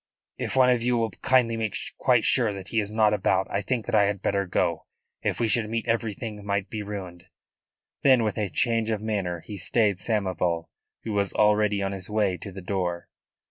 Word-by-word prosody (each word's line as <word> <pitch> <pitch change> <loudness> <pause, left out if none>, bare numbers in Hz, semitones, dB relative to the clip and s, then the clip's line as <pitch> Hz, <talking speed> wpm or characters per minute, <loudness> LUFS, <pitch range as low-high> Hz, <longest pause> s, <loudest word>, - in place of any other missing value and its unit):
"If - - -3
one 130 -1 +5
of 125 -2 +2
you 120 +1 +1
will 115 -2 0
kindly 120 +3 +2
make 110 -2 -1 0.2
quite 125 -3 +3
sure 120 -5 +3
that 95 -1 -8
he 115 - +1
is 105 -1 -2
not 110 -1 +3
about 95 -1 +1
I 100 - 0
think 120 0 -2
that - - -5
I 105 -2 +5
had 100 0 -1
better 100 -1 0
go. 85 -2 -1 0.3
If - - -1
we 115 - +2
should 110 -1 +1
meet 115 0 -2
everything 115 -2 -2
might 100 -1 -2
be 110 - -3
ruined." 95 -4 -7 0.8
Then 130 -4 +5
with 105 -2 -1
a 105 -2 -1
change 115 +3 +1
of 110 -1 -2
manner 95 -6 -2
he 105 +3 -8
stayed 100 0 +1
Samoval, 90 -6 -1 0.3
who 110 - -4
was 100 -1 0
already 105 -1 +3
on 95 - -1
his 95 -1 -5
way 105 -3 +1
to 100 - -9
the 95 0 -9
door. 90 -2 -2
105 Hz, 210 wpm, -26 LUFS, 95-115 Hz, 0.8 s, one